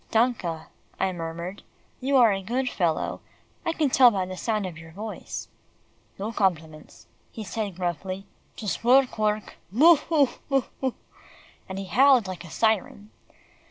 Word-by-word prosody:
"Danke," 220 Hz, -9 st, +1 dB, 0.4 s
I 190 Hz, -, +1 dB
murmured, 170 Hz, +3 st, -6 dB, 0.4 s
"you 270 Hz, +1 st, +2 dB
are 230 Hz, -5 st, +6 dB
a 195 Hz, -, -3 dB
good 250 Hz, +7 st, -1 dB
fellow; 170 Hz, -9 st, -1 dB, 0.4 s
I 330 Hz, -, 0 dB
can 310 Hz, -4 st, 0 dB
tell 250 Hz, -1 st, +8 dB
by 195 Hz, -5 st, -1 dB
the 185 Hz, 0 st, -6 dB
sound 215 Hz, +1 st, -1 dB
of 180 Hz, -3 st, -6 dB
your 165 Hz, 0 st, -12 dB
voice." 210 Hz, +5 st, -6 dB, 0.7 s
"No 205 Hz, +3 st, -3 dB
compliments," 160 Hz, -7 st, -2 dB, 0.3 s
he 220 Hz, -, -7 dB
said 205 Hz, 0 st, -4 dB
gruffly, 185 Hz, +2 st, -3 dB, 0.3 s
"just 210 Hz, -1 st, -4 dB
work, 255 Hz, 0 st, +4 dB
work 210 Hz, 0 st, -1 dB
Boo, 315 Hz, -, +7 dB
hoo! 290 Hz, -3 st, +2 dB, 0.2 s
boo 270 Hz, -2 st, +3 dB, 0.2 s
hoo!" 260 Hz, -2 st, -1 dB, 0.7 s
and 190 Hz, -, -5 dB
he 195 Hz, -, -4 dB
howled 250 Hz, +4 st, +5 dB
like 185 Hz, -2 st, -6 dB
a 170 Hz, -, -11 dB
siren. 215 Hz, +1 st, 0 dB
210 Hz, 155 wpm, -26 LUFS, 185-245 Hz, 0.7 s, tell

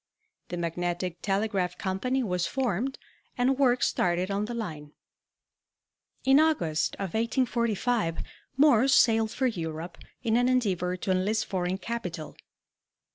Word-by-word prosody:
The 175 Hz, -, -5 dB
Magnetic 175 Hz, +1 st, -3 dB
Telegraph 195 Hz, -3 st, -1 dB
Company 250 Hz, +8 st, -1 dB
was 180 Hz, -5 st, -1 dB
formed 260 Hz, 0 st, -1 dB, 0.4 s
and 255 Hz, +2 st, +2 dB
work 250 Hz, -2 st, +3 dB
started 180 Hz, +2 st, +1 dB
on 200 Hz, +1 st, 0 dB
the 240 Hz, +2 st, -5 dB
line. 155 Hz, -10 st, -6 dB, 1.3 s
In 270 Hz, +2 st, +6 dB
August 175 Hz, -, +1 dB
of 190 Hz, -4 st, -5 dB
1845 235 Hz, -5 st, 0 dB, 0.3 s
Morse 270 Hz, -2 st, +5 dB
sailed 225 Hz, -2 st, +4 dB
for 260 Hz, -, -2 dB
Europe 165 Hz, -6 st, -4 dB, 0.2 s
in 230 Hz, -1 st, +2 dB
an 245 Hz, +1 st, +3 dB
endeavor 185 Hz, -8 st, 0 dB
to 190 Hz, -, -2 dB
enlist 210 Hz, +4 st, +1 dB
foreign 185 Hz, -2 st, -2 dB
capital. 185 Hz, -7 st, -5 dB
205 Hz, 125 wpm, -28 LUFS, 180-245 Hz, 1.3 s, In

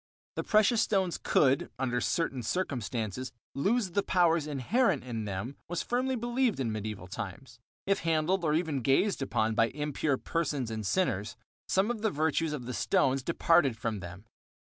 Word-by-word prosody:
That -, -, -3 dB
precious 215 Hz, +1 st, +4 dB
stones 190 Hz, -6 st, +1 dB
could, 135 Hz, -1 st, +3 dB
under 125 Hz, -2 st, -1 dB
certain 135 Hz, -6 st, 0 dB
circumstances, 120 Hz, -, -2 dB, 0.2 s
lose 200 Hz, -, +1 dB
the 200 Hz, -, +2 dB
powers 170 Hz, -5 st, +2 dB
inherent 155 Hz, -, +1 dB
in 115 Hz, -4 st, -4 dB
them 105 Hz, +7 st, -4 dB
was 175 Hz, 0 st, -2 dB
firmly 255 Hz, +2 st, 0 dB
believed 240 Hz, -, 0 dB
in 120 Hz, -4 st, 0 dB
medieval 105 Hz, -3 st, -5 dB
times. 115 Hz, +6 st, -7 dB, 0.3 s
If 195 Hz, 0 st, +2 dB
handled 165 Hz, +3 st, +1 dB
or 155 Hz, -2 st, +2 dB
even 160 Hz, -5 st, 0 dB
gazed 140 Hz, -, +2 dB
upon 110 Hz, -4 st, 0 dB
by 115 Hz, +1 st, +3 dB
impure 145 Hz, 0 st, -1 dB
persons 145 Hz, -8 st, -2 dB
and 110 Hz, -1 st, -4 dB
sinners, 105 Hz, -, 0 dB, 0.3 s
some 195 Hz, +5 st, +2 dB
of 230 Hz, -3 st, -5 dB
the 220 Hz, -, +2 dB
virtues 160 Hz, -1 st, 0 dB
of 145 Hz, -5 st, -4 dB
the 125 Hz, -, -4 dB
stones 135 Hz, +2 st, +2 dB
departed 165 Hz, -4 st, +3 dB
from 110 Hz, -2 st, -2 dB
them. 90 Hz, +3 st, -9 dB
145 Hz, 160 wpm, -30 LUFS, 120-185 Hz, 0.3 s, precious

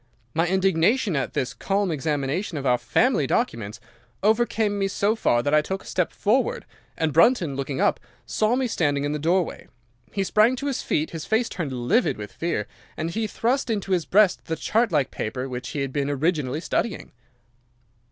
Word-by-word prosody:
My 165 Hz, +2 st, +1 dB
indignation 190 Hz, +3 st, +2 dB
at 135 Hz, -, -2 dB
this 125 Hz, -1 st, -1 dB
calm 195 Hz, +6 st, 0 dB
examination 150 Hz, +4 st, -2 dB
of 140 Hz, -, -4 dB
our 125 Hz, -1 st, +3 dB
family -, -, +2 dB
documents 110 Hz, -1 st, -1 dB, 0.4 s
overcame 220 Hz, -1 st, +2 dB
me 195 Hz, -, +1 dB
so 205 Hz, +2 st, +1 dB
far 120 Hz, -, +2 dB
that 145 Hz, -, 0 dB
I 150 Hz, -, +6 dB
took 190 Hz, +5 st, -4 dB
a -, -, -19 dB
step 180 Hz, -2 st, -1 dB
forward, 270 Hz, -, 0 dB, 0.3 s
and 160 Hz, -2 st, 0 dB
Brunton, 170 Hz, -, +4 dB
looking 135 Hz, 0 st, -3 dB
up, -, -, +2 dB, 0.3 s
saw 215 Hz, -, +1 dB
me 260 Hz, 0 st, 0 dB
standing 145 Hz, -, 0 dB
in 145 Hz, -, -1 dB
the 150 Hz, -, -2 dB
doorway. 170 Hz, +3 st, 0 dB, 0.4 s
He 195 Hz, -, -1 dB
sprang 215 Hz, +6 st, +3 dB
to 275 Hz, -, -6 dB
his 275 Hz, -3 st, -1 dB
feet, 155 Hz, +1 st, -1 dB
his 165 Hz, -2 st, -6 dB
face 225 Hz, +2 st, +1 dB
turned 160 Hz, -6 st, -4 dB
livid 130 Hz, -, +1 dB
with 105 Hz, -1 st, -7 dB
fear, 165 Hz, -11 st, -2 dB, 0.3 s
and 165 Hz, +2 st, -2 dB
he 220 Hz, +3 st, -1 dB
thrust 250 Hz, +4 st, 0 dB
into 200 Hz, -3 st, -2 dB
his 180 Hz, -3 st, +1 dB
breast 200 Hz, -1 st, +3 dB
the 165 Hz, -, -2 dB
chart 225 Hz, +6 st, +1 dB
like 145 Hz, -5 st, +1 dB
paper 125 Hz, +4 st, -4 dB
which 125 Hz, -1 st, -5 dB
he 145 Hz, -, -3 dB
had 135 Hz, -1 st, -3 dB
been 145 Hz, -1 st, -1 dB
originally 150 Hz, -1 st, 0 dB
studying. 215 Hz, +4 st, -2 dB
170 Hz, 190 wpm, -24 LUFS, 140-215 Hz, 0.4 s, I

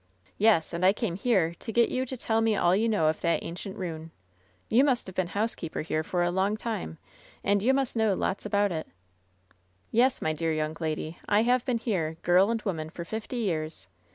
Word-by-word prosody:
"Yes, 205 Hz, -7 st, +3 dB
and 170 Hz, +2 st, -2 dB
I 190 Hz, +1 st, +6 dB
came 210 Hz, -4 st, -2 dB
here 190 Hz, -4 st, +1 dB
to 225 Hz, -, -6 dB
get 235 Hz, +1 st, +3 dB
you 260 Hz, +1 st, -1 dB
to 260 Hz, -, -4 dB
tell 225 Hz, -1 st, 0 dB
me 225 Hz, -1 st, +2 dB
all 175 Hz, -2 st, +3 dB
you 225 Hz, +3 st, +2 dB
know 205 Hz, -8 st, +2 dB
of 155 Hz, 0 st, +1 dB
that 170 Hz, -, +1 dB
ancient 185 Hz, +3 st, -6 dB
ruin. 165 Hz, -4 st, -5 dB, 0.6 s
You 240 Hz, +5 st, +4 dB
have 255 Hz, -4 st, +1 dB
been 185 Hz, -1 st, 0 dB
housekeeper 200 Hz, -4 st, -2 dB
here 155 Hz, 0 st, -1 dB
for 175 Hz, +2 st, 0 dB
a 175 Hz, -, +1 dB
long 195 Hz, +4 st, +1 dB
time, 220 Hz, -, -4 dB, 0.5 s
and 200 Hz, 0 st, +2 dB
you 245 Hz, +6 st, +3 dB
must 270 Hz, -2 st, 0 dB
know 220 Hz, -3 st, +2 dB
lots 190 Hz, -, -2 dB
about 205 Hz, -1 st, +1 dB
it" 160 Hz, -2 st, -4 dB, 1.0 s
"Yes, 255 Hz, +3 st, +3 dB
my 155 Hz, -, 0 dB
dear 160 Hz, +1 st, -1 dB
young 155 Hz, 0 st, -2 dB
lady, 155 Hz, 0 st, -3 dB
I 210 Hz, +2 st, +4 dB
have 245 Hz, +1 st, +2 dB
been 250 Hz, -3 st, +1 dB
here, 175 Hz, -9 st, -2 dB
girl 180 Hz, +4 st, +5 dB
and 230 Hz, -1 st, -1 dB
woman, 160 Hz, -6 st, -3 dB
for 170 Hz, +1 st, -7 dB
fifty 220 Hz, +6 st, -5 dB
years. 155 Hz, -, -3 dB
195 Hz, 210 wpm, -28 LUFS, 165-225 Hz, 1.0 s, I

